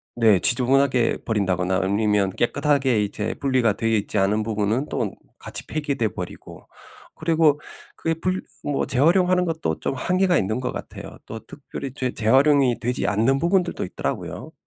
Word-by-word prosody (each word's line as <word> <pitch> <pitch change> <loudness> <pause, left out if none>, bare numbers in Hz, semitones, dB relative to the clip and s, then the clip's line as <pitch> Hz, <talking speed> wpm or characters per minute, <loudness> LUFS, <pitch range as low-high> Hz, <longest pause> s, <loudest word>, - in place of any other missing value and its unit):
네. 110 -5 +4
지저분하게 130 - +3
버린다거나 95 -3 0
아니면 100 0 +1
깨끗하게 130 -1 +1
이제 105 +1 -3
분리가 130 -6 +2
되어 115 +1 -2
있지 105 -1 0
않은 105 +3 +2
부분은 110 +5 -1
또 - - -2 0.3
같이 - - -5
폐기되어 140 -7 -1
버리고. 90 -1 -9 0.5
그리고 160 -2 +2 0.4
그 165 - -3
예 - - +3
분 185 +3 -2 0.2
뭐 145 -1 -1
재활용하는 180 +6 +3
것도 160 - -2
좀 - - -2
한계가 180 +6 +1
있는 110 +5 -1
것 125 - -2
같아요. - - -9
또 - - -7
특별히 135 -2 -8
재 130 -3 -2
재활용이 130 +2 +3
되지 125 +2 -1
않는 115 +7 +2
부분들도 175 +1 0
있더라고요. 90 - -5
125 Hz, 360 characters per minute, -23 LUFS, 105-150 Hz, 0.5 s, 네